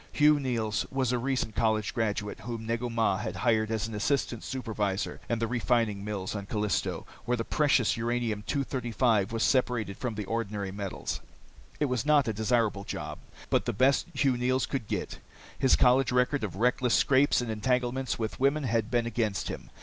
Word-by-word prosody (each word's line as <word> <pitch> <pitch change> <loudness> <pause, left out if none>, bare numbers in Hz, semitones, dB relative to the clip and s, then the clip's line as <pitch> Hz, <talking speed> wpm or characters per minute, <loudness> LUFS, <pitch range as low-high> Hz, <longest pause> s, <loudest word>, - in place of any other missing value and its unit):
Hugh 150 0 +5
Neils 115 -7 -1
was 130 -2 0
a 125 - +1
recent 125 -3 -1
college 110 -2 +1
graduate 105 -2 -2
whom 115 -2 -6
Negu 115 +2 -1
Mah 115 -4 +1
had - - -4
hired 110 -3 +2
as 110 -1 -1
an 115 - -8
assistant 120 +2 -1
supervisor 105 -6 -2
in 115 - +1
the 115 - 0
refining 115 -3 0
mills 100 -3 -3
on 100 -1 -5
Callisto, 105 -1 -1 0.2
where 125 0 +1
the 115 - -2
precious 140 -6 +2
uranium 115 -2 -1
235 120 -6 +1
was 115 0 0
separated 120 -6 +1
from 125 -4 -3
the 105 -1 -4
ordinary 105 -2 -3
metal. 100 -1 -6 0.7
It 150 - +2
was 125 -4 -1
not 150 -4 +4
a 110 - 0
desirable 110 -2 +1
job, - - -5 0.3
but - - +2
the - - -1
best 130 +6 +3
Hugh 135 -2 +2
Neils 130 +2 +1
could 130 -7 -4
get. - - -3 0.4
His 130 - +5
college 130 +1 +4
record 125 +1 +2
of 100 -4 -3
reckless 125 +3 +2
scrapes 140 +1 +4
and 120 -2 -2
entanglements 125 +3 0
with 110 -1 -4
women 140 +3 +2
had 115 -3 0
been 120 -1 +1
against 110 -5 -1
him. - - -7
115 Hz, 180 wpm, -29 LUFS, 110-125 Hz, 0.7 s, Hugh